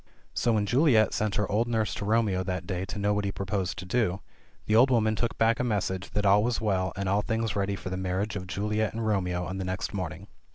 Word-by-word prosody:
So 120 Hz, -, +1 dB
when 105 Hz, -2 st, +1 dB
Juliet 120 Hz, -2 st, +4 dB
sent 105 Hz, -1 st, 0 dB
her 105 Hz, -3 st, 0 dB
old 110 Hz, +4 st, +2 dB
nurse 110 Hz, -2 st, 0 dB
to 100 Hz, -, -4 dB
Romeo 105 Hz, -3 st, +2 dB
that 90 Hz, -2 st, -3 dB
day 90 Hz, 0 st, -3 dB
to 95 Hz, -, -6 dB
know 100 Hz, 0 st, +1 dB
what 105 Hz, 0 st, 0 dB
he 100 Hz, -, -1 dB
purposed 95 Hz, -1 st, -2 dB
to 95 Hz, -, -6 dB
do, 95 Hz, -2 st, 0 dB, 0.5 s
the 110 Hz, -, 0 dB
ol3 120 Hz, +5 st, +6 dB
woman 110 Hz, -3 st, +2 dB
took 120 Hz, +1 st, -2 dB
back 115 Hz, +1 st, +3 dB
a -, -, +1 dB
message 100 Hz, -5 st, -1 dB
that 105 Hz, 0 st, 0 dB
all 100 Hz, +1 st, +5 dB
was 120 Hz, +1 st, 0 dB
well, 95 Hz, -4 st, 0 dB
and 100 Hz, 0 st, -3 dB
all 100 Hz, +2 st, +2 dB
things 115 Hz, 0 st, -1 dB
ready 100 Hz, 0 st, 0 dB
for 95 Hz, -, -7 dB
the 95 Hz, -, -2 dB
marriage 95 Hz, +3 st, -2 dB
of 95 Hz, -2 st, -5 dB
Juliet 105 Hz, +2 st, -1 dB
and 115 Hz, 0 st, -3 dB
Romeo 90 Hz, -4 st, 0 dB
on 95 Hz, +1 st, -5 dB
the -, -, -2 dB
next 95 Hz, +3 st, -3 dB
morning. 90 Hz, -2 st, -4 dB
100 Hz, 250 wpm, -28 LUFS, 95-110 Hz, 0.5 s, ol3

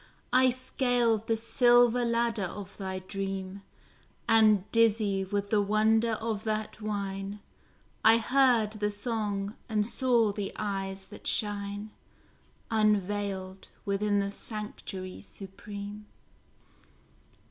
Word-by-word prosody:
I 255 Hz, 0 st, +6 dB
scaled 245 Hz, -3 st, 0 dB
the 225 Hz, -, +1 dB
silver 240 Hz, +1 st, +4 dB
ladder 235 Hz, -2 st, 0 dB
of 200 Hz, +2 st, -9 dB
thy 190 Hz, -2 st, -4 dB
dream, 195 Hz, 0 st, -5 dB, 0.7 s
And 215 Hz, -4 st, +5 dB
dizzy 215 Hz, -4 st, +2 dB
with 200 Hz, +1 st, -3 dB
the 210 Hz, -2 st, +4 dB
wonder 220 Hz, +2 st, +2 dB
of 220 Hz, -1 st, -3 dB
that 215 Hz, 0 st, -3 dB
wine, 200 Hz, -1 st, -4 dB, 0.6 s
I 225 Hz, +1 st, +7 dB
heard 240 Hz, -2 st, +3 dB
the 210 Hz, -1 st, -1 dB
song, 205 Hz, -1 st, -3 dB
and 210 Hz, -2 st, +1 dB
saw 235 Hz, -2 st, +2 dB
the 200 Hz, -1 st, -4 dB
eyes 195 Hz, -2 st, -4 dB
that -, -, -7 dB
shine 205 Hz, 0 st, +1 dB, 0.8 s
Unveiled, 205 Hz, -3 st, 0 dB, 0.2 s
within 205 Hz, +1 st, +1 dB
the 200 Hz, 0 st, -2 dB
sanctuary 200 Hz, -3 st, -7 dB
supreme. 205 Hz, +1 st, -9 dB
210 Hz, 105 wpm, -29 LUFS, 200-225 Hz, 0.8 s, I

